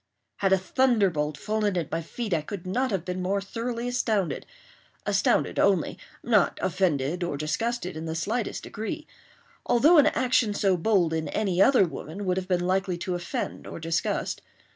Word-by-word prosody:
Had 195 Hz, -2 st, +1 dB
a 190 Hz, -, +6 dB
thunderbolt 190 Hz, -, +1 dB
fallen 210 Hz, +1 st, -1 dB
at 170 Hz, -, -2 dB
my 165 Hz, -, -1 dB
feet 210 Hz, +5 st, -4 dB
I 160 Hz, -, +2 dB
could 185 Hz, +4 st, -7 dB
not 250 Hz, +8 st, 0 dB
have 190 Hz, -5 st, -2 dB
been 180 Hz, 0 st, -3 dB
more 195 Hz, +2 st, 0 dB
thoroughly 230 Hz, +4 st, -4 dB
astounded—astounded 215 Hz, -, -1 dB
only—not 200 Hz, +3 st, +1 dB
offended 170 Hz, -3 st, 0 dB
or 170 Hz, -5 st, -2 dB
disgusted 180 Hz, +7 st, -2 dB
in 160 Hz, +1 st, -5 dB
the 160 Hz, 0 st, -3 dB
slightest 215 Hz, +7 st, -2 dB
degree; 305 Hz, +9 st, -5 dB, 0.6 s
although 300 Hz, +8 st, +5 dB
an 290 Hz, -, +6 dB
action 250 Hz, -6 st, +2 dB
so 195 Hz, -2 st, +2 dB
bold 175 Hz, -2 st, +2 dB
in 160 Hz, -1 st, -1 dB
any 195 Hz, -4 st, 0 dB
other 250 Hz, -2 st, +6 dB
woman 175 Hz, +3 st, -6 dB
would 185 Hz, 0 st, +1 dB
have 185 Hz, -1 st, -3 dB
been 180 Hz, -1 st, +1 dB
likely 185 Hz, -1 st, 0 dB
to 180 Hz, +1 st, -3 dB
offend 175 Hz, 0 st, -4 dB
or -, -, -7 dB
disgust. 165 Hz, +1 st, -1 dB
190 Hz, 165 wpm, -26 LUFS, 170-225 Hz, 0.6 s, a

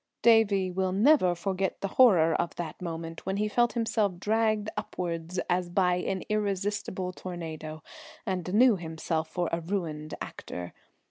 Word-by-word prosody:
Davie 205 Hz, -5 st, +4 dB
will 185 Hz, 0 st, 0 dB
never 205 Hz, -, +4 dB
forget 190 Hz, +2 st, -2 dB
the 195 Hz, -, -2 dB
horror 185 Hz, -10 st, +5 dB
of 170 Hz, -, -1 dB
that 170 Hz, -1 st, -6 dB
moment 165 Hz, -1 st, -5 dB
when 190 Hz, +1 st, 0 dB
he 210 Hz, +1 st, +1 dB
felt 240 Hz, +2 st, +2 dB
himself 220 Hz, -5 st, 0 dB
dragged 215 Hz, +1 st, +1 dB
upwards 170 Hz, 0 st, -4 dB
as 180 Hz, 0 st, 0 dB
by 180 Hz, 0 st, +2 dB
an 190 Hz, +1 st, -2 dB
irresistible 200 Hz, -3 st, -1 dB
tornado, 160 Hz, -4 st, -7 dB, 0.4 s
and 185 Hz, -3 st, -2 dB
knew 230 Hz, +1 st, +5 dB
himself 160 Hz, -1 st, -3 dB
for 175 Hz, -1 st, -1 dB
a 165 Hz, -, -1 dB
ruined 160 Hz, -4 st, -3 dB
actor. 90 Hz, 0 st, -7 dB
185 Hz, 145 wpm, -28 LUFS, 170-205 Hz, 0.4 s, horror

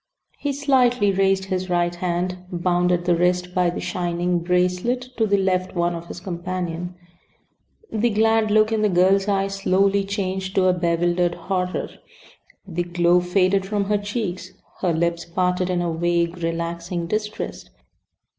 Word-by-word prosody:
He 285 Hz, -, -1 dB
slightly 255 Hz, -6 st, +3 dB
raised 195 Hz, 0 st, +2 dB
his 185 Hz, -1 st, -3 dB
right 175 Hz, 0 st, +1 dB
hand, 180 Hz, +1 st, -2 dB
bound 175 Hz, 0 st, +1 dB
at 175 Hz, -1 st, 0 dB
the 175 Hz, -1 st, +3 dB
wrist 180 Hz, +1 st, +1 dB
by 180 Hz, -1 st, +2 dB
the 175 Hz, -, -4 dB
shining 175 Hz, 0 st, -1 dB
"bracelet" 180 Hz, +8 st, 0 dB
to 220 Hz, -1 st, +2 dB
the 200 Hz, 0 st, +3 dB
left 185 Hz, -1 st, 0 dB
one 175 Hz, 0 st, +1 dB
of 170 Hz, 0 st, -7 dB
his -, -, -7 dB
companion. 175 Hz, -1 st, -4 dB, 1.0 s
The 220 Hz, +2 st, +1 dB
glad 220 Hz, 0 st, +2 dB
look 215 Hz, +1 st, +4 dB
in 220 Hz, -1 st, +1 dB
the 210 Hz, -, +3 dB
girl's 190 Hz, +2 st, +3 dB
eyes 195 Hz, -1 st, 0 dB
slowly 195 Hz, +1 st, +2 dB
changed 190 Hz, -1 st, -3 dB
to 190 Hz, -, +3 dB
a 185 Hz, -, +4 dB
bewildered 175 Hz, 0 st, +1 dB
horror. 180 Hz, +1 st, -2 dB, 0.8 s
The 175 Hz, -1 st, -2 dB
glow 175 Hz, 0 st, +3 dB
faded 185 Hz, +2 st, +2 dB
from 200 Hz, +1 st, -1 dB
her 205 Hz, +1 st, +1 dB
cheeks. 205 Hz, -3 st, -4 dB, 0.3 s
Her 180 Hz, -, +1 dB
lips 170 Hz, +1 st, 0 dB
parted 180 Hz, +1 st, 0 dB
in 175 Hz, -1 st, 0 dB
a 170 Hz, -1 st, -1 dB
vague, 170 Hz, +1 st, 0 dB
relaxing 170 Hz, +1 st, -3 dB
distress. 210 Hz, +4 st, -4 dB
180 Hz, 155 wpm, -22 LUFS, 175-195 Hz, 1.0 s, look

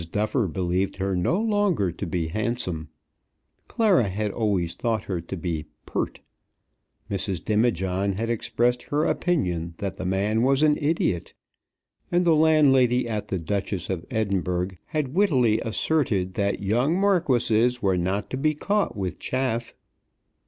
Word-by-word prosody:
Duffer 105 Hz, +2 st, 0 dB
believed 90 Hz, +2 st, -1 dB
her 95 Hz, 0 st, -1 dB
no 90 Hz, -, +1 dB
longer 205 Hz, -, +1 dB
to 90 Hz, +3 st, -6 dB
be 85 Hz, -1 st, -2 dB
handsome; 90 Hz, -6 st, -2 dB, 0.8 s
Clara 210 Hz, -, +3 dB
had 105 Hz, +2 st, -2 dB
always 95 Hz, -7 st, 0 dB
thought 110 Hz, +3 st, -1 dB
her 90 Hz, -4 st, -3 dB
to 90 Hz, +3 st, -6 dB
be 80 Hz, -3 st, -3 dB, 0.2 s
pert; -, -, -3 dB, 0.9 s
Mrs. 95 Hz, -3 st, -3 dB
Demijohn 100 Hz, -3 st, +1 dB
had 110 Hz, +4 st, -2 dB
expressed 120 Hz, +1 st, 0 dB
her 150 Hz, +2 st, +1 dB
opinion 90 Hz, -, 0 dB
that 100 Hz, -1 st, -4 dB
the 95 Hz, -, -5 dB
man 100 Hz, +4 st, +1 dB
was 135 Hz, +3 st, +3 dB
an 150 Hz, -1 st, +5 dB
idiot; 145 Hz, -, 0 dB, 0.8 s
and 175 Hz, +1 st, +2 dB
the 170 Hz, -, +5 dB
landlady 135 Hz, -6 st, +4 dB
at 110 Hz, -2 st, -3 dB
the 95 Hz, -, -2 dB
"Duchess 95 Hz, +1 st, -3 dB
of 90 Hz, -3 st, -3 dB
Edinburgh" 95 Hz, -6 st, -1 dB, 0.2 s
had 150 Hz, -5 st, -2 dB
wittily 130 Hz, -, +3 dB
asserted 110 Hz, -6 st, 0 dB
that 100 Hz, 0 st, -1 dB
"young 125 Hz, -, +1 dB
marquises 125 Hz, -, +2 dB
were 95 Hz, -2 st, +3 dB
not 95 Hz, +4 st, -2 dB
to 130 Hz, -, -2 dB
be 155 Hz, +3 st, +1 dB
caught 200 Hz, -, 0 dB
with 95 Hz, -2 st, -3 dB
chaff." 125 Hz, -3 st, -2 dB
110 Hz, 145 wpm, -25 LUFS, 95-135 Hz, 0.9 s, an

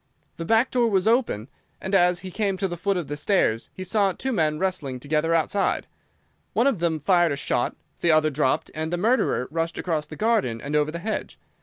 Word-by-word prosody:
The 165 Hz, -, -5 dB
back 225 Hz, +6 st, +3 dB
door 240 Hz, -2 st, +2 dB
was 195 Hz, -1 st, +1 dB
open, 225 Hz, -, +1 dB, 0.3 s
and 190 Hz, -, -5 dB
as 180 Hz, -2 st, +4 dB
he 185 Hz, -, -7 dB
came 200 Hz, -1 st, -1 dB
to 195 Hz, -, 0 dB
the 175 Hz, -, -5 dB
foot 195 Hz, +3 st, -1 dB
of 170 Hz, -5 st, -3 dB
the 145 Hz, -, -4 dB
stairs 145 Hz, -, +1 dB
he 185 Hz, -, -7 dB
saw 200 Hz, 0 st, +2 dB
two 265 Hz, -, -3 dB
men 155 Hz, -8 st, +1 dB
wrestling 155 Hz, -8 st, -2 dB
together 155 Hz, +4 st, 0 dB
outside. 180 Hz, +5 st, 0 dB, 0.7 s
One 235 Hz, -, +2 dB
of 275 Hz, -9 st, +2 dB
them 165 Hz, -2 st, 0 dB
fired 175 Hz, -1 st, +3 dB
a -, -, -1 dB
shot, 125 Hz, -3 st, -1 dB, 0.2 s
the 170 Hz, -, +1 dB
other 155 Hz, 0 st, +3 dB
dropped, 140 Hz, -2 st, 0 dB
and 160 Hz, +1 st, -3 dB
the 175 Hz, -, 0 dB
murderer 215 Hz, -, +1 dB
rushed 165 Hz, +1 st, -2 dB
across 160 Hz, -4 st, -2 dB
the -, -, -9 dB
garden 215 Hz, -, +1 dB
and 145 Hz, +5 st, -4 dB
over 150 Hz, 0 st, +2 dB
the 165 Hz, -, -4 dB
hedge. 215 Hz, +5 st, -4 dB
Mr. -, -, -41 dB
175 Hz, 220 wpm, -24 LUFS, 150-200 Hz, 0.7 s, as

